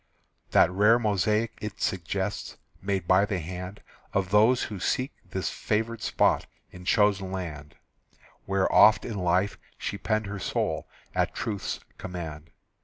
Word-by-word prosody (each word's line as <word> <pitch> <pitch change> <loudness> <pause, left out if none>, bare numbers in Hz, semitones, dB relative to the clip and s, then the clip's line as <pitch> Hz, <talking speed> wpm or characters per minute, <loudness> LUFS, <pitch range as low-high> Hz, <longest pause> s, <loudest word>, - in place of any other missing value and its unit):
That - - +5
rare 105 +5 +5
mosaic 105 0 0
it 105 -1 -5
suggests 95 +2 -2 0.2
Made 95 -3 -1
by 95 +2 +5
the 100 -2 -1
hand 90 +3 -6 0.3
Of 95 -2 0
those 110 +5 +5
who 105 -3 -5
seek 130 - 0 0.2
this 95 - -2
favored 110 +1 -1
spot - - +2 0.2
In 90 0 -11
chosen 100 -2 +2
land, 75 -6 -6 0.7
Where, 95 0 +2
oft 110 - +7
in 110 -4 -4
life, 90 +3 +1 0.2
she 100 - -4
penned 110 +2 0
her 100 0 -5
soul - - -1 0.3
At - - 0
Truth's 105 -3 -3 0.2
command. 85 -4 -6
100 Hz, 140 wpm, -27 LUFS, 90-105 Hz, 0.7 s, oft